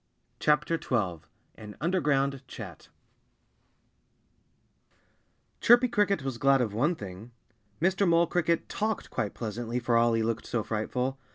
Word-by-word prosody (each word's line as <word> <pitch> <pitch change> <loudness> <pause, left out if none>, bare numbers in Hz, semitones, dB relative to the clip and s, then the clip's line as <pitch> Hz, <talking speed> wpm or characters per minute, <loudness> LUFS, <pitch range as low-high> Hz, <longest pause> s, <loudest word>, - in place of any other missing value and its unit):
XII 150 - +6 1.0
AN 105 -1 -11
UNDERGROUND 140 -5 +1
CHAT 95 - -10 2.7
Chirpy 240 +2 +6
Cricket 200 - +1
was 130 -3 -4
glad 135 +1 +4
of 115 -5 -1
one 150 +11 +1
thing. 100 - -9 0.5
Mr. 190 +3 +2
Mole 170 0 +4
Cricket 170 -1 0
talked 215 0 -3
quite 105 - -3
pleasantly, 120 +1 -4
for 120 -1 0
all 115 0 +4
he 115 0 +1
looked 115 0 -2
so 115 -3 -1
frightful. 125 +5 -2
135 Hz, 120 wpm, -28 LUFS, 115-170 Hz, 2.7 s, XII